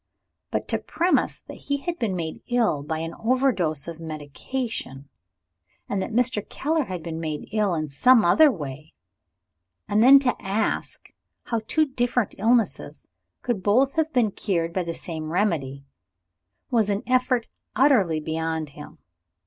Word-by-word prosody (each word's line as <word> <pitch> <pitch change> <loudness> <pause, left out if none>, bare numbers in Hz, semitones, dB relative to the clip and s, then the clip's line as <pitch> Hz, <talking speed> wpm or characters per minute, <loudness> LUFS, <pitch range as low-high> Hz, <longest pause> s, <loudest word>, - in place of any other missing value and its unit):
But - - -2
to - - +1
premise 345 +4 0
that - - -11
he 285 - +1
had 340 +4 -4
been 205 -5 -1
made 160 -3 -4
ill 235 - +1
by 155 +2 -3
an 165 +1 -4
overdose 225 - +1
of 165 -1 -7
medicine, 155 - -5 0.8
and 200 -1 -1
that 190 - -4
Mr. 235 -2 +1
Keller 310 0 0
had 180 -6 -6
been 165 -1 -5
made 155 -2 -4
ill 210 -4 +1
in 155 -1 -2
some 225 - +4
other 300 - +6
way, 150 - -8 0.9
and 205 +1 +2
then 265 +4 +9
to 265 -3 +1
ask, 200 +3 -2 0.3
how 230 -2 -2
two 315 -1 +3
different 245 -4 -1
illnesses 230 +1 +1 0.4
could 235 -6 -1
both 255 +8 +3
have 320 0 0
been 240 -6 +2
cured 170 -5 -2
by 185 - 0
the 170 -1 -4
same 160 -2 -5
remedy 150 -8 -1 0.9
was 225 -4 +2
an 200 0 -1
effort 255 -1 +1 0.3
utterly 215 - +4
beyond 160 0 -3
him. 145 +1 -12
205 Hz, 150 wpm, -24 LUFS, 160-250 Hz, 0.9 s, then